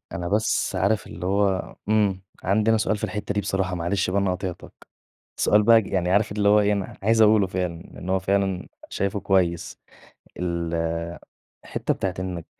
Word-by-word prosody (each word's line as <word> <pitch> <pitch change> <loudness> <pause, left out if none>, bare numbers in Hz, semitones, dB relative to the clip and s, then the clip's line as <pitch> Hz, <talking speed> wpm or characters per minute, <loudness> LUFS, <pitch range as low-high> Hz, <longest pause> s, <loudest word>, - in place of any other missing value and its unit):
أنا 85 +1 -3
بس 105 +3 0
عارف 105 +2 +1
اللي 85 +2 -7
هو 100 -1 0
إمم، 105 -3 +2 0.2
عندي 105 +4 +2
أنا 110 - +4
سؤال 110 0 0
في - - -4
الحتّة 105 -1 -3
دي 105 - +1
بصراحة 95 -2 -1
معلش 90 +2 -1
بقى 100 +2 +1
أنا 100 -1 +1
قاطعتك، 90 -1 -8 0.5
سؤال 105 +1 +4
بقى 115 +1 +6
ج - - -10
يعني 90 -2 -1
عارف 100 +2 +2
اللي 100 0 +1
هو 105 +1 +6
إيه 105 0 +2
أنا 100 -2 -4
عايز 110 +2 +4
أقوله 105 -2 +5
فعلًا، 90 -2 -3
لإن 90 - -9
هو 95 - +3
فعلًا 95 -1 -1 0.2
شايفه 100 +1 -2
كويس، 90 -4 0 0.6
الحتّة 85 -1 -4
بتاعة 95 - -2
إنك 90 -3 -4
95 Hz, 175 wpm, -24 LUFS, 90-105 Hz, 0.6 s, بقى